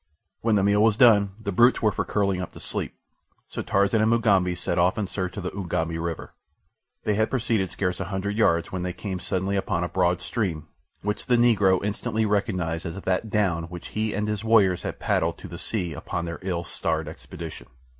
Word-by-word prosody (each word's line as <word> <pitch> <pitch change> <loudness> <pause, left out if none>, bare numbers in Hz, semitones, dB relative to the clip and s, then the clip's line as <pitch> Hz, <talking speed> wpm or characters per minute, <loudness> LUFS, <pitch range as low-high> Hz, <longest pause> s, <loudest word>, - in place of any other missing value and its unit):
When 110 -1 +2
the 100 - +3
meal 100 +1 +3
was 110 -1 +4
done 105 -6 +5
the 105 -2 -3
brutes 120 +7 +5
were 110 -2 +2
for 95 - -1
curling 100 -3 0
up 90 - -6
to - - -11
sleep, - - -4 0.5
so - - -5
Tarzan 100 +3 +2
and 110 - +3
Mugambi 100 -6 +3
set 90 0 -1
off 90 +4 +3
in 105 - 0
search 90 0 -4
of 100 - -4
the 90 - -3
Ugambi 85 -3 -2
River. 85 -1 -4 0.7
They 105 - +1
had 110 +2 +1
proceeded 115 -7 0
scarce 90 0 -2
a - - -2
hundred 100 +1 -3
yards 85 -7 +2
when 95 - -3
they 90 0 -2
came 95 -1 -5
suddenly 95 +2 -1
upon 95 -3 0
a - - 0
broad 90 -1 +1
stream, 85 -9 -2 0.4
which 105 +1 -3
the 125 -1 +4
Negro 100 -6 +4
instantly 110 +2 -1
recognized 95 -6 -1
as 85 +4 -5
that 95 +3 -1
down 95 -6 +1
which 85 0 -8
he 110 0 -2
and 105 +1 -1
his 105 0 -2
warriors 105 -5 +4
had - - -4
paddled - - 0
to - - -9
the - - -8
sea 90 -7 -2
upon 85 +3 -4
their 85 0 -5
ill 90 -2 -2
starred 80 -2 -2
expedition. 80 - -8
95 Hz, 210 wpm, -25 LUFS, 90-105 Hz, 0.7 s, done